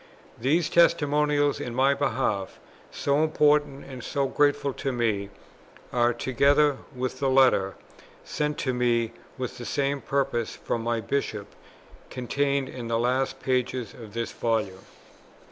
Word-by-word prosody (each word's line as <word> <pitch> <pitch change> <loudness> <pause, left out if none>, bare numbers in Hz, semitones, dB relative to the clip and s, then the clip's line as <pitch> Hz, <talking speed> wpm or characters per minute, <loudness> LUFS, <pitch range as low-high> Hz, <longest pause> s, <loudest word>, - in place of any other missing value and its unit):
These 155 +7 +2
testimonials 150 -3 +3
in 120 - -5
my 135 +2 +4
behalf, 115 -8 -1 0.3
so 140 +2 +1
important 150 -2 +2
and 130 -3 -9
so 140 -1 -1
grateful 145 0 +1
to 135 - -3
me, 110 -5 -1 0.6
are, 120 0 +3
together 140 +4 +2 0.2
with 125 0 -3
the 135 - +1
Letter, 130 -8 +4 0.5
sent 150 0 -2
to 130 - -1
me 120 -2 +1 0.3
with 130 -1 -5
the - - -6
same 140 +1 -1
purpose, 135 -4 -1
from 115 - -3
my 115 0 -1
Bishop, 105 -3 -3 0.6
contained 140 +2 -1
in 120 -2 -7
the 115 0 0
last 125 +3 0
pages 125 -3 -1
of 110 -2 -12
this 115 -1 -2
Volume. 105 -5 -2
130 Hz, 135 wpm, -26 LUFS, 115-140 Hz, 0.6 s, my